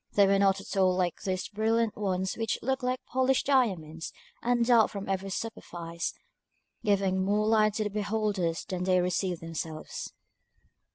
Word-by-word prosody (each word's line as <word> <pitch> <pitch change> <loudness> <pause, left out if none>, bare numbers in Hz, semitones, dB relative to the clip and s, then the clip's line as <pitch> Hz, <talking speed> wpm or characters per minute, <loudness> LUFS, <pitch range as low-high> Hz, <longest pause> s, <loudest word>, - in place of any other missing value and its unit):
They 200 - +6
were 195 0 +3
not 195 -1 +3
at 195 - -7
all 185 -2 +4
like 180 -2 -1
those 185 0 -2
brilliant 225 +1 +1
ones 190 -2 -1
which 225 -2 -1
look 265 +2 0
like 255 0 -2
polished 260 0 +1
diamonds, 185 - +1 0.3
and 240 0 +2
dart 230 -2 +5
from 200 -1 -6
every 195 0 -2
superfice, 170 -6 -4 0.7
giving 195 -3 +2
more 205 +2 +2
light 215 -1 +3
to 215 - 0
the 210 - -2
beholders 205 -5 -1
than 180 -1 -3
they 185 -1 +4
receive 180 0 -1
themselves. 160 -1 -5
200 Hz, 160 wpm, -29 LUFS, 185-220 Hz, 0.7 s, They